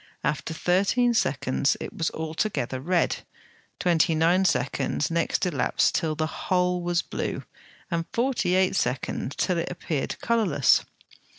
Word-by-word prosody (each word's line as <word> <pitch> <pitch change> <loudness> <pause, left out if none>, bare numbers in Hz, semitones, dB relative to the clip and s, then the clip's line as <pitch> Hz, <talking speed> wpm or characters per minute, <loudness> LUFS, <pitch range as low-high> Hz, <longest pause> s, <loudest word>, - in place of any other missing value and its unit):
After 150 +2 -1
thirteen 195 +9 +2
seconds 135 - +1
it - - -7
was 165 - 0
altogether 160 - -2
red; 175 +5 +1 0.6
twenty 165 -2 +2
nine 175 +4 +3
seconds 150 -1 0
next 170 +3 0
elapsed 150 -8 +1
till 155 -2 0
the 155 +1 0
whole 180 +2 0
was 175 0 0
blue, - - -4 0.5
and 165 -1 -1
forty 235 -7 +1
eight 190 0 +2
seconds 135 -3 -2
till 180 -3 0
it - - -2
appeared 160 -5 -3
colourless. 220 - +3
170 Hz, 130 wpm, -26 LUFS, 155-185 Hz, 0.6 s, nine